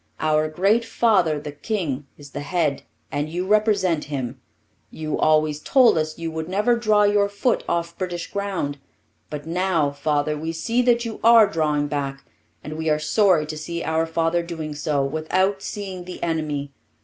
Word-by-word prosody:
Our 155 0 +2
great 195 +9 +2
father, 195 -10 +2
the 150 0 -7
king, 145 - -3
is 145 -1 -13
the - - -5
head, 150 -1 -1 0.3
and 145 +2 -2
you 175 +3 -3
represent 200 -6 +2
him. 130 -3 -5 0.5
You 155 -1 -4
always 155 -1 +3
told 255 - +4
us 155 -1 -1
you 165 -1 -4
would 160 +1 -5
never 210 +6 +2
draw 215 -3 +3
your 205 0 +3
foot 205 +4 0
off 170 0 -1
British 175 -2 -3
ground; 190 -8 -2 0.5
but 150 -1 -6
now, 170 -3 +1
father, 145 +1 0
we 160 +2 -4
see 230 +9 0
that 240 -1 +2
you 225 -2 -5
are 230 -1 +8
drawing 150 -5 0
back, 140 -2 -4 0.4
and 155 +1 -6
we 160 0 -1
are 150 - +3
sorry 165 +1 +3
to 155 +1 -6
see 170 +2 -4
our 160 +1 0
father 165 +1 +1
doing 160 -3 -5
so, 145 -1 0
without 185 +7 0
seeing 190 -4 -6
the 180 - -8
enemy. 155 -4 -2
165 Hz, 175 wpm, -23 LUFS, 150-195 Hz, 0.5 s, are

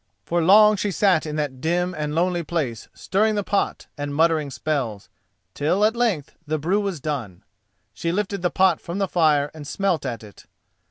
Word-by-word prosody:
For 175 0 0
long 210 +5 +6
she 205 - -1
sat 185 -5 +2
in 150 - -4
that 145 -4 -3
dim 175 +2 0
and 150 0 -3
lonely 175 +1 +1
place 145 -9 -3
stirring 215 +3 0
the 205 - 0
pot 200 +1 -1
and 145 0 -3
muttering 160 -2 +2
spells, 130 -8 -3 0.4
till 180 +8 +1
at 220 +2 +2
length 220 - 0
the 155 +1 0
brew 175 +7 0
was 195 -5 -3
done. 125 - -5 0.5
She 165 +11 -2
lifted 200 +1 -2
the 175 - +1
pot 185 -2 +2
from 170 +3 -5
the 195 -1 0
fire 150 -5 +2
and 150 -2 -9
smelt 195 -1 0
at 120 -5 -4
it. 105 -2 -15
165 Hz, 185 wpm, -23 LUFS, 145-195 Hz, 0.5 s, long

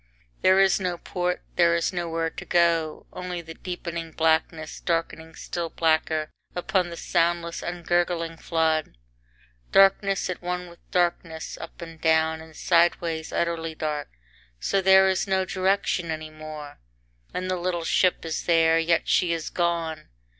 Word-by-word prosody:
There 190 +1 +5
is 195 0 +4
no 180 -2 -2
port, 180 +1 -2
there 170 -1 +5
is 170 +2 0
nowhere 165 -2 -2
to - - -8
go 165 -2 +1
only 180 -1 -4
the 165 -1 -9
deepening 170 -2 -5
blackness 160 0 0
darkening 165 -1 -2
still 170 -2 -4
blacker 155 -1 +1 0.2
upon 180 0 0
the 170 - -7
soundless, 170 -1 0
ungurgling 175 -1 -1
flood 160 - 0 0.7
darkness 195 0 +4
at 185 - -4
one 180 0 -3
with 170 - -16
darkness, 170 -2 -1
up - - -9
and 165 -1 -11
down 160 0 +2
and 160 -1 -14
sideways 170 -2 +1
utterly 165 -1 -1
dark, 150 -2 -3 0.5
so 195 - +1
there 190 0 +6
is 190 +1 +1
no 190 -1 +1
direction 190 -2 0
any 155 -1 -4
more 155 -1 -9 0.5
and 185 0 -3
the 185 - 0
little 175 -1 -2
ship 180 -1 +2
is 160 - -3
there; 165 -1 +4
yet 165 0 +1
she 180 -2 +3
is 165 -2 -4
gone. 165 -3 -1
170 Hz, 145 wpm, -25 LUFS, 160-180 Hz, 0.7 s, there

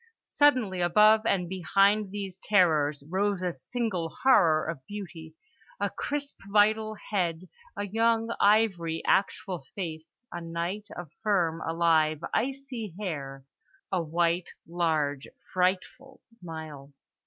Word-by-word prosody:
Suddenly 250 -11 +2
above 215 +5 +5
and 180 -3 +1
behind 195 +3 +2
these 195 -2 -6
terrors 155 -8 +2
rose 190 +2 0
a 180 -1 -1
single 210 -9 -3
horror 175 -12 +5
of 160 -6 -5
beauty—a 205 - -8
crisp 285 -1 -4
vital 215 +1 +3 0.2
head, 180 -3 -1 0.3
a 205 - -2
young 225 +2 +1
ivory, 190 -6 +2
actual 190 -4 0
face, 165 +3 -7
a 175 - -5
night 170 +5 -4
of 175 -4 -8
firm, 175 -7 +1
alive, 160 -2 +2
icy 255 -7 -3
hair, 140 -8 -5 0.5
a 185 -2 +1
white, 170 +2 0 0.2
large, 155 -5 -1 0.3
frightful 190 +9 -1
smile. 160 -9 -10
185 Hz, 110 wpm, -28 LUFS, 165-215 Hz, 0.5 s, above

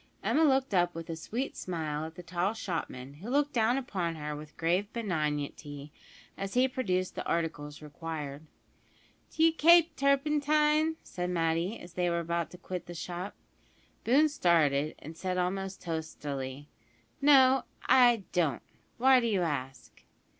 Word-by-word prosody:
Emma 320 - +3
looked 265 -5 +2
up 175 -2 +2
with 165 0 -6
a - - -3
sweet 235 +11 -4
smile 155 -4 -3
at 160 - -12
the 180 - -9
tall 180 +4 -1
shopman, 150 - -5
who 215 - -6
looked 290 +2 +1
down 235 +2 +2
upon 185 -10 -2
her 150 -1 -5
with 150 +1 -11
grave 180 +5 0
benignity, 150 -7 -3 0.5
as 195 +2 -4
he 255 +1 +5
produced 185 -8 -1
the - - -4
articles 155 -3 -3
required. 150 -1 -6 0.9
"D'you 325 0 +3
kape 330 0 +6
turpentine?" 300 +3 +2
said 180 0 -4
Matty, 170 +4 0
as 175 0 -12
they 180 0 0
were 170 0 0
about 170 0 -2
to 180 - -12
quit 180 0 -6
the 175 - -8
shop. 175 +3 -5 0.7
Boone 280 +7 +5
started, 155 - +2
and 160 +3 -10
said 185 +2 -3
almost 190 +1 -2
testily, 145 -4 -5 0.5
"No, 270 -2 +6 0.2
I 240 -5 +5
don't. 160 -8 0 0.3
Why 260 +1 +6
do 235 - 0
you 200 -5 +1
ask?" 130 -7 -5
180 Hz, 150 wpm, -30 LUFS, 160-250 Hz, 0.9 s, kape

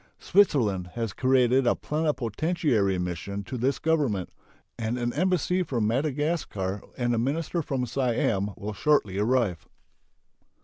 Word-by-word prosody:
Switzerland 120 - +2
has 115 -4 -2
created 130 0 +3
a - - +4
plenipotentiary 150 - 0
mission 90 +3 -4
to 125 - -6
this 130 +3 0
Government, 140 - 0 0.4
and 115 +1 -2
an 120 -1 -1
embassy 180 +2 +1
from 120 -11 -1
Madagascar 130 - -1 0.2
and 120 -1 0
a 115 - +1
minister 155 +7 -1
from 135 -4 -2
Siam 115 -5 0
will 105 +1 -5
shortly 105 -5 +1
arrive. 105 -7 +1
120 Hz, 125 wpm, -27 LUFS, 105-150 Hz, 0.4 s, a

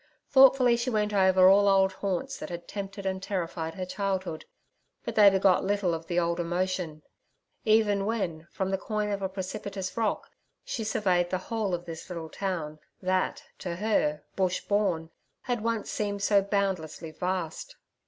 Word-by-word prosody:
Thoughtfully 260 -3 +6
she 240 +2 -1
went 210 -2 0
over 190 -1 +5
all 200 +1 +6
old 195 -1 +4
haunts 190 -2 -2
that 155 - -6
had 170 -1 -7
tempted 200 0 -6
and 190 0 -2
terrified 170 -4 -3
her 185 -1 -4
childhood. 185 -3 -3 0.6
But - - -3
they 210 -2 +8
begot 190 -1 +3
little 200 -2 +1
of 165 0 -5
the 175 0 +1
old 170 0 0
emotion, 175 -2 -2 0.6
even 210 -2 +3
when 170 -8 -2
from 190 0 -2
the 190 - 0
coign 210 -1 -2
of 200 -1 -2
a 190 - -1
precipitous 190 0 -5
rock 225 -2 -1 0.3
she 225 - -3
surveyed 185 -5 +1
the 185 - 0
whole 205 -1 -2
of 175 0 -8
this 165 0 -8
little 165 -3 -6
town 165 -6 -4 0.2
that, 185 0 0 0.2
to 175 -2 -4
her—bush 185 -2 0
born—had 205 +4 -2
once 230 -2 -1
seemed 205 -1 -2
so 200 -1 +4
boundlessly 190 -5 -2
vast. 180 - -3
190 Hz, 160 wpm, -28 LUFS, 175-205 Hz, 0.6 s, they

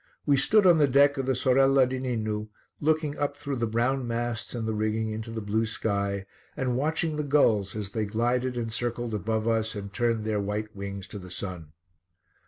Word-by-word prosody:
We 145 - +4
stood 205 +10 +4
on 175 -3 +6
the 145 - +5
deck 140 +2 +4
of 135 - -2
the 130 - +2
Sorella 135 +1 +4
di 130 +1 -3
Ninu, 110 -4 -2 0.3
looking 155 -1 +1
up 145 0 -1
through 140 -2 -4
the 120 -1 0
brown 120 +3 0
masts 120 0 -3
and 115 -2 -3
the 110 - 0
rigging 110 +1 -1
into 110 +1 -5
the 115 0 -4
blue 110 +2 +1
sky, 100 -2 -1 0.3
and 130 -4 0
watching 155 +3 0
the 150 - -1
gulls 110 -9 +2
as 105 -2 -4
they 110 +1 -1
glided 120 +4 0
and 115 -2 -3
circled 120 0 -2
above 110 +2 -1
us 110 -1 +1
and 100 -1 -6
turned 115 -1 +1
their 110 -1 0
white 105 +2 -3
wings 100 -1 -5
to 105 - -7
the 90 -1 -10
sun. 90 -4 -6
115 Hz, 200 wpm, -27 LUFS, 105-135 Hz, 0.3 s, on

